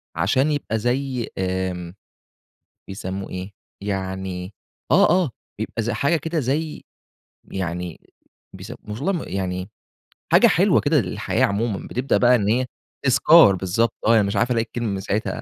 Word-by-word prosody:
عشان 120 Hz, -, +2 dB
يبقى 135 Hz, -6 st, -1 dB
زي 125 Hz, +1 st, -1 dB
آآ، 95 Hz, -2 st, -2 dB, 0.9 s
بيسموه 95 Hz, 0 st, -5 dB
إيه؟ 95 Hz, +2 st, -6 dB, 0.3 s
يعني 95 Hz, -1 st, -4 dB, 0.4 s
آه -, -, +6 dB
آه، 180 Hz, -4 st, +3 dB, 0.3 s
بيبقى 115 Hz, +1 st, -3 dB
ز 115 Hz, -, -2 dB
حاجة 140 Hz, +7 st, +1 dB
كده 160 Hz, +1 st, -2 dB
زي 150 Hz, +4 st, -2 dB, 0.7 s
يعني 90 Hz, -2 st, -4 dB, 0.6 s
بيس 95 Hz, +6 st, -8 dB, 0.2 s
والله 135 Hz, -, -1 dB
ما 175 Hz, -, -3 dB
يعني 90 Hz, 0 st, -3 dB, 0.6 s
حاجة -, -, +7 dB
حلوة -, -, +4 dB
كده -, -, +2 dB
للحياة -, -, 0 dB
عمومًا. 100 Hz, 0 st, -2 dB
بتبدأ 125 Hz, +3 st, 0 dB
بقى 125 Hz, 0 st, +5 dB
إن 105 Hz, -4 st, 0 dB
هي 125 Hz, +3 st, +2 dB, 0.4 s
تذكار 135 Hz, -, +6 dB
بالضبط 95 Hz, +5 st, 0 dB
آه، 115 Hz, -2 st, +6 dB
مش 100 Hz, +1 st, -1 dB
عارف 120 Hz, +5 st, +1 dB
ألاقي 115 Hz, -2 st, +2 dB
الكلمة 120 Hz, -1 st, -4 dB
من 100 Hz, -1 st, -2 dB
ساعتها 105 Hz, +3 st, -2 dB
105 Hz, 145 wpm, -22 LUFS, 95-125 Hz, 0.9 s, حاجة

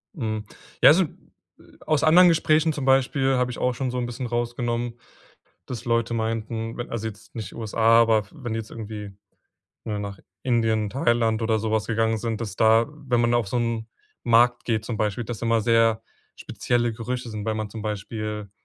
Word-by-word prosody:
Hm. 110 Hz, -7 st, -3 dB, 0.4 s
Ja, -, -, +9 dB
also, 175 Hz, +6 st, +6 dB
äh, -, -, -3 dB, 0.8 s
aus 155 Hz, -1 st, +1 dB
anderen 175 Hz, +3 st, +7 dB
Gesprächen 160 Hz, -1 st, +3 dB
zum 140 Hz, -3 st, -4 dB
Beispiel 135 Hz, 0 st, +3 dB
habe 125 Hz, 0 st, 0 dB
ich -, -, -7 dB
auch 125 Hz, 0 st, 0 dB
schon 130 Hz, +1 st, -3 dB
so 125 Hz, -, -3 dB
'n 125 Hz, -, -1 dB
bisschen 120 Hz, +1 st, -5 dB
rausgenommen, 120 Hz, 0 st, -2 dB, 0.7 s
dass 125 Hz, -2 st, -7 dB
Leute 115 Hz, 0 st, +1 dB
meinten, 115 Hz, 0 st, -3 dB
wenn 120 Hz, -, -5 dB
also, 115 Hz, -1 st, -3 dB
jetzt 110 Hz, -, -11 dB
nicht 105 Hz, -4 st, -6 dB
USA, 115 Hz, +1 st, +3 dB
aber 110 Hz, -2 st, +3 dB
wenn 125 Hz, -8 st, -5 dB
jetzt 110 Hz, -1 st, -5 dB
irgendwie 105 Hz, -2 st, -7 dB, 0.7 s
'ne, 105 Hz, -2 st, -3 dB
nach 100 Hz, -2 st, -6 dB, 0.2 s
Indien, 115 Hz, -4 st, +1 dB
Thailand 115 Hz, -2 st, +1 dB
oder 110 Hz, -1 st, +1 dB
so 110 Hz, 0 st, -2 dB
was 110 Hz, -1 st, +1 dB
gegangen 115 Hz, 0 st, +1 dB
sind, 110 Hz, 0 st, -3 dB
dass 105 Hz, -4 st, -5 dB
da 110 Hz, +2 st, +4 dB
wenn 135 Hz, -5 st, -1 dB
man 120 Hz, 0 st, +2 dB
auf 120 Hz, -4 st, +1 dB
so 120 Hz, +5 st, -1 dB
'nen 115 Hz, -1 st, -2 dB, 0.4 s
Markt 120 Hz, +1 st, +4 dB
geht 110 Hz, -2 st, -1 dB
zum 115 Hz, -, -4 dB
Beispiel, 105 Hz, +2 st, -1 dB
dass 115 Hz, -1 st, -6 dB
immer 115 Hz, -1 st, +2 dB
sehr 115 Hz, -1 st, +3 dB, 0.3 s
spezielle 120 Hz, -1 st, -1 dB
Gerüche 125 Hz, +2 st, -4 dB
sind, 105 Hz, -1 st, -5 dB
weil 110 Hz, -1 st, -1 dB
man 110 Hz, -1 st, -3 dB
zum 110 Hz, +1 st, -7 dB
Beispiel 105 Hz, 0 st, -4 dB
115 Hz, 190 wpm, -24 LUFS, 110-120 Hz, 0.8 s, Ja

